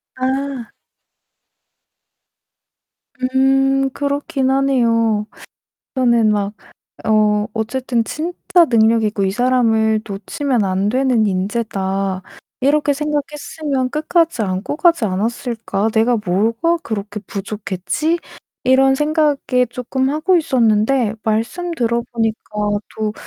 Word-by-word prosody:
아. 265 -1 -3 2.6
음 270 0 +3
그렇긴 280 0 -1
하네요. 230 -6 +2 0.7
저는 235 -4 +3
막 205 0 -1 0.5
"어 210 -1 +3
어쨌든 240 +1 -1
'진짜 345 +4 +1
능력 225 -1 +4
있고 210 -2 0
이 190 - +1
사람을 225 -2 +2
놓치면 235 - -1
안 190 +1 0
되는 250 -2 +2
인재다.' 195 -1 -2 0.4
이렇게 290 +2 +2
생각했으면 295 -2 -2
끝까지 315 -2 +1
안고 190 +6 -2
가지 335 -8 +3
않았을까? 220 +1 -2
내가 230 +2 +3
뭐가 230 - +1
그렇게 210 -1 -5
부족했지?" 205 - -2 0.5
이런 265 +1 +4
생각에 295 -3 +1
쪼끔 260 +2 -1
하고 310 +5 +2
있었는데 235 -6 +2
말씀 230 +12 -1
들어보니까 230 -5 -2 0.4
'또 215 -1 -1
240 Hz, 220 characters per minute, -18 LUFS, 215-275 Hz, 2.6 s, 능력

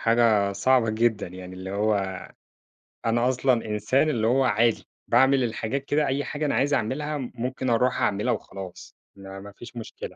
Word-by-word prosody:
حاجة 115 -4 +3
صعبة 125 +1 +3
جدًا، 110 -2 +1
يعني 90 +1 -9
اللي 95 +1 -7
هو 105 +2 +1 1.1
أنا 120 +2 +2
أصلًا 130 -2 +1
إنسان 110 +8 +1
اللي 110 -7 +1
هو 130 +3 +3
عادي، 115 -1 +2 0.2
باعمل 130 +2 +4
الحاجات 120 +3 -2
كده 145 +1 +1
أي 135 +2 0
حاجة 150 +1 -3
أنا 145 - 0
عايز 145 +2 +1
أعملها 145 +5 -1
ممكن 130 0 -4
أروْح 125 +2 +2
أعملها 100 +1 +1
وخلاص، 95 -2 -8 0.2
ما 95 0 -9
ما 100 +1 -10
فيش 120 +5 -12
مشكلة. 115 - -8
115 Hz, 165 wpm, -25 LUFS, 105-130 Hz, 1.1 s, باعمل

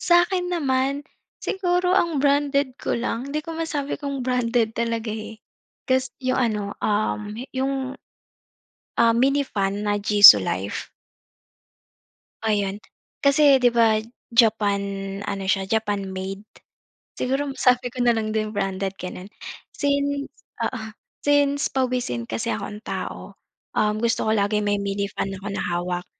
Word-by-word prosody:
Sa'kin 355 +1 +3
naman, 280 -3 0 0.3
siguro 360 -1 0
ang 340 -5 +2
branded 280 -1 +2
ko 235 - -2
lang, 245 +3 -3
hindi 300 - -1
ko 330 - -6
masabi 305 -3 -2
kung 280 -3 -4
branded 240 -2 +1
talaga 230 -1 -2
eh, 220 0 -8 0.5
kasi 260 -1 +1
yung 255 -1 0
ano, 210 -1 -2 0.2
um, 210 0 0 0.2
yung, 265 0 -2 1.0
ah, 230 -1 +5
mini 275 +4 +2
fan 200 -3 -2
na 205 0 0
Jisulife. 105 - +6 1.5
Ayun, 205 -2 0 0.4
kasi 280 -1 +5
'di 250 - +5
ba, 230 -2 +3 0.3
Japan 215 -4 +3 0.5
ano 200 -1 -3
siya, 190 0 0
Japan 205 -3 -1
made. 190 +2 -5 0.7
Siguro 270 +2 -1
sabi 250 -1 +2
ko 255 - -6
na 240 -1 +3
lang 215 -1 -2
din 215 -1 0
branded, 195 0 -2
gano'n. 180 +1 -7 0.5
Since 280 -1 0 0.4
oo, 245 -4 -3 0.4
since 285 -1 +2
pawisin 250 - -1
kasi 110 0 -4
akong 205 - -4
tao, - - -6 0.4
um, 210 0 +2
gusto 230 0 +1
ko 220 - +1
laging 210 0 +1
may 205 0 +1
mini-fan 200 0 -2
ako 195 - -10
na - - -2
hawak. 175 +1 -2
230 Hz, 130 wpm, -23 LUFS, 205-275 Hz, 1.5 s, Jisulife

